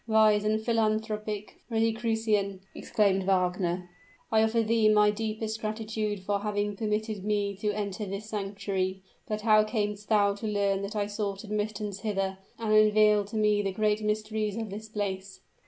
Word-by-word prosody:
"Wise 215 -2 +4
and 215 +1 +1
philanthropic 215 -2 -1
Rosicrucian!" 220 -3 0
exclaimed 200 -3 +1
Wagner, 180 -1 +1 0.4
"I 220 -1 +5
offer 225 +1 +2
thee 220 -1 +3
my 210 -1 +5
deepest 220 0 -3
gratitude 215 -1 -2
for 200 +1 0
having 205 0 -1
permitted 215 -1 -2
me 205 -1 0
to 210 +1 -1
enter 205 0 -3
this 195 +2 -5
sanctuary. 195 -2 -3 0.2
But 215 0 -2
how 215 -1 +5
camest 210 -2 -2
thou 205 -2 +4
to 220 - -4
learn 200 -2 +1
that 200 +2 -5
I 205 -1 +1
sought 205 -1 -3
admittance 210 -1 -3
hither? 195 -3 -2 0.2
and 220 -2 0
unveil 215 -1 +5
to 210 +3 -9
me 210 -1 +3
the 195 -1 -1
great 210 +2 +1
mysteries 215 0 -1
of 225 -3 -4
this 215 +2 -7
place." 195 -2 -4
210 Hz, 155 wpm, -28 LUFS, 200-215 Hz, 0.4 s, I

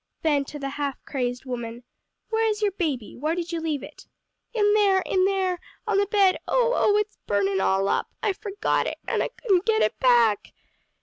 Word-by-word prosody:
Then 290 -3 +2
to 295 - -8
the 275 -1 -4
half 280 -2 -1
crazed 250 -2 -3
woman, 240 -1 -5 0.5
"Where 445 0 +2
is 425 0 -2
your 410 - +3
baby? 305 - -3
where 305 +6 -1
did 345 -1 -4
you 335 -1 -2
leave 310 -4 -2
it?" 300 - -12 0.4
"In 415 -3 +3
there, 400 -3 +4
in 370 -1 +2
there 380 -2 0 0.3
on 420 -3 +2
the 405 - +2
bed, 395 -2 +3
oh, - - +2
oh, 415 - +3
it's 420 0 -2
burnin' 200 -1 +1
all 195 +1 +2
up! - - 0 0.2
I 410 - +2
forgot 410 +1 -1
it, - - -4
an' - - 0
I - - 0
couldn't 385 -7 0
get 435 - +2
back." 235 -5 +3
345 Hz, 195 wpm, -25 LUFS, 250-410 Hz, 0.5 s, there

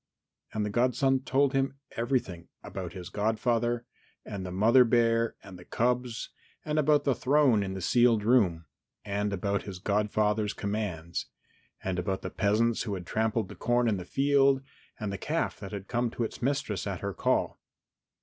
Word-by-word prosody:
And 105 -1 -1
the 105 - -3
godson 130 +3 +2
told 135 +1 +2
him 135 0 0 0.2
everything 115 -8 -2 0.2
about 90 -3 -6
his 90 -1 -7
godfather 115 +3 0 0.4
and 100 -2 -5
the 90 - -5
mother 115 +7 +5
bear 115 -1 +2
and 95 -2 -11
the - - -11
cubs 125 +2 -1 0.4
and 155 0 0
about 150 -1 +3
the 140 - +2
throne 130 -4 +3
in 95 -1 -3
the 95 - -5
sealed 120 0 +4
room, 100 -9 +3 0.4
and 105 0 -1
about 100 +1 -1
his 95 -3 -7
godfather's 105 +1 0
commands, 100 -5 -3 0.6
and 95 -1 -1
about 95 +2 -2
the - - -4
peasants 110 +3 +1
who 105 -4 -2
had 90 -2 -7
trampled 110 +1 0
the - - -9
corn 120 0 +1
in 105 -3 +1
the 90 - -5
field, 135 +5 +3 0.4
and 105 -3 -3
the 100 - -5
calf 165 +2 -2
that 100 -2 -8
had 100 -2 -6
come 120 -1 0
to 115 - -3
its 110 - -5
mistress 125 - -1
at - - -4
her - - -3
call. - - 0
110 Hz, 175 wpm, -29 LUFS, 100-125 Hz, 0.6 s, mother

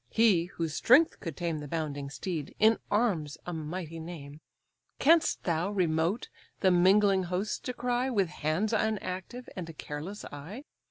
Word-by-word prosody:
(he, 210 -7 +4
whose 165 -3 -4
strength 270 - +5
could 165 -5 -6
tame 170 -3 -2
The 145 - -7
bounding 145 -3 -3
steed, 155 0 -5
in 220 +1 +5
arms 185 -10 +1
a 175 - -4
mighty 165 +1 -5
name) 155 -3 -9 0.6
Canst 325 +3 +4
thou, 170 +2 0
remote, 175 +1 0 0.3
the 190 - +5
mingling 190 +1 +4
hosts 180 +4 -2
descry, 250 +1 -1
With 200 -8 +1
hands 175 +7 -1
unactive, 215 +2 -2
and 175 -3 -5
a - - -8
careless 155 +7 -6
eye? 165 - -8
180 Hz, 150 wpm, -30 LUFS, 160-210 Hz, 0.6 s, strength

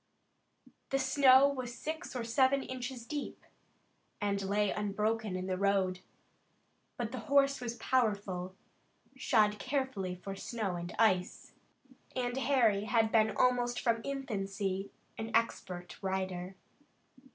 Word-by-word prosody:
The 270 - +1
snow 265 0 +6
was 255 -4 -4
six 315 -3 -5
or 245 - -2
eight 260 +3 +2
inches 250 -1 -5
deep, 295 +2 -5 0.7
and 200 -1 0
lay 200 +1 +1
unbroken 210 0 -1
in 185 0 -3
the 185 -1 -2
road. 195 -2 +1 1.0
But - - -3
the - - -4
horse 275 -1 +4
was 240 -1 -3
powerful, 200 -8 0 0.6
shod 210 -1 +2
carefully 260 -9 -2
for 195 +2 -7
snow 205 -2 -3
and 175 0 -5
ice, 185 -5 +1 0.6
and 245 -1 -1
Harry 235 -6 +2
had 225 -1 +2
been 220 -1 +3
almost 245 -1 +2
from 230 -1 +1
infancy 195 -7 -3 0.3
an 225 0 -3
expert 180 -6 -2
rider. 190 -1 -3
220 Hz, 120 wpm, -32 LUFS, 195-255 Hz, 1.0 s, snow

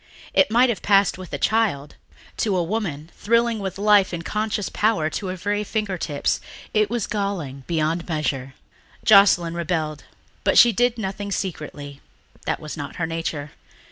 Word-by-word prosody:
It 280 - +4
might 245 +3 +4
have 220 -6 -2
passed 195 -2 +3
with 185 - -9
a - - -2
child; 200 -11 0 0.4
to 200 -4 +1
a 175 - +1
woman, 170 -5 -3
thrilling 230 +1 +1
with 195 -2 -4
life 205 -1 +4
and 170 -1 -4
conscious 210 -2 -1
power 205 -8 +1
to 195 - -4
her 185 - -3
very 205 +4 -1
fingertips, 195 -9 -2 0.3
it 215 -1 +2
was 235 -2 -1
galling 175 -11 -3
beyond 165 +1 -1
measure. 135 -4 -2 0.5
Joscelyn 195 -5 +6
rebelled, 160 -3 -2 0.4
but - - +2
she 240 - +8
did 245 +3 +1
nothing 200 -1 -4
secretly... 150 -7 -5 0.5
that - - 0
was 155 - -7
not 145 -3 -6
her 165 - -1
nature. 165 -2 -4
185 Hz, 160 wpm, -23 LUFS, 155-210 Hz, 0.5 s, she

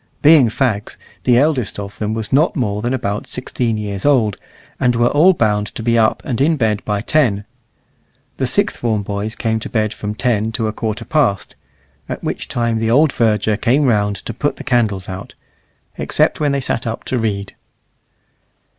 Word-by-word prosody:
Being 150 -5 +7
fags, 110 -3 -1 0.3
the 120 -1 +5
eldest 135 -4 +1
of 100 +2 -7
them 110 +1 -2
was 110 -1 -4
not 150 +5 +3
more 105 -7 -1
than 120 +2 -1
about 110 -5 -2
sixteen 120 -3 -2
years 100 -2 -4
old, 120 -9 +3 0.4
and 125 -1 +2
were 120 +1 +3
all 170 +6 +5
bound 105 - +1
to 110 - -7
be 115 0 +2
up 110 -1 +2
and 130 -1 -2
in 155 +3 +3
bed 110 -5 0
by 105 -1 -1
ten. 110 -6 +1 0.9
The - - 0
sixth - - +1
form 110 -3 -1
boys 100 +2 -4
came 110 -2 -1
to - - -7
bed 110 -2 0
from 105 0 -5
ten 110 -3 0
to 110 -1 -1
a 110 - -3
quarter 110 -1 -4
past 145 - 0 0.5
(at - - -5
which - - -3
time 115 -2 -1
the 110 0 0
old 145 +5 +4
verger 110 -2 +1
came 125 +7 +2
round 105 -5 +2
to 105 +4 -7
put 145 +6 -1
the - - -9
candles 110 -7 0
out), 95 0 -8 0.6
except - - +1
when 150 -2 +1
they 140 0 0
sat 120 -2 -1
up 115 - -4
to 130 - -2
read. 100 -3 -2
115 Hz, 190 wpm, -18 LUFS, 105-130 Hz, 0.9 s, Being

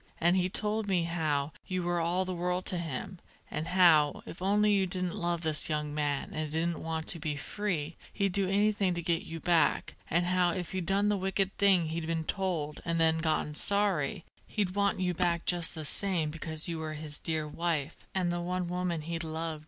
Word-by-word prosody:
And 175 +2 +4
he 185 -1 +2
told 210 +2 -1
me 185 -3 +2
how 155 -4 0 0.2
you 185 -1 -1
were 175 0 0
all 175 +3 +1
the 185 - -3
world 180 +1 -1
to 180 - +1
him, 170 +3 -5 0.3
and 155 +2 -2
how, 165 -5 +5
if 170 - -9
only 205 +2 +3
you 195 -2 +3
didn't 180 -1 -1
love 170 -1 -1
this 155 -3 +1
young 150 -1 -1
man 145 -2 -1
and 155 -1 -3
didn't 165 +1 0
want 160 -1 -2
to 170 - 0
be 150 -2 -2
free, 165 -1 -3
he'd 195 -2 0
do 195 -1 +1
anything 200 -2 +2
to 170 - -3
get 170 0 +1
you 165 0 -6
back, 170 0 +2 0.2
and 170 +2 +2
how 180 -1 +2
if 180 0 -4
you'd 185 -3 -2
done 200 +2 +2
the 205 - +2
wicked 195 +1 0
thing 190 -5 +4
he'd 160 0 -3
been 165 -1 -1
told 170 -7 -2
and 165 -1 -1
then 160 0 +4
gotten 155 -2 0
sorry, 190 -5 0 0.2
he'd 200 -4 -1
want 200 -1 +1
you 180 -1 +1
back 170 -1 0
just 175 -2 +1
the 155 -1 -5
same 170 -2 +1
because 160 0 -2
you 165 -2 -3
were 155 -1 -4
his 150 -1 -3
dear 155 -2 -1
wife, 160 -1 -1 0.2
and 180 -2 +1
the 175 0 -2
one 180 0 -2
woman 180 -2 -1
he 165 +1 -3
loved. 160 -1 -3
170 Hz, 210 wpm, -30 LUFS, 160-185 Hz, 0.3 s, how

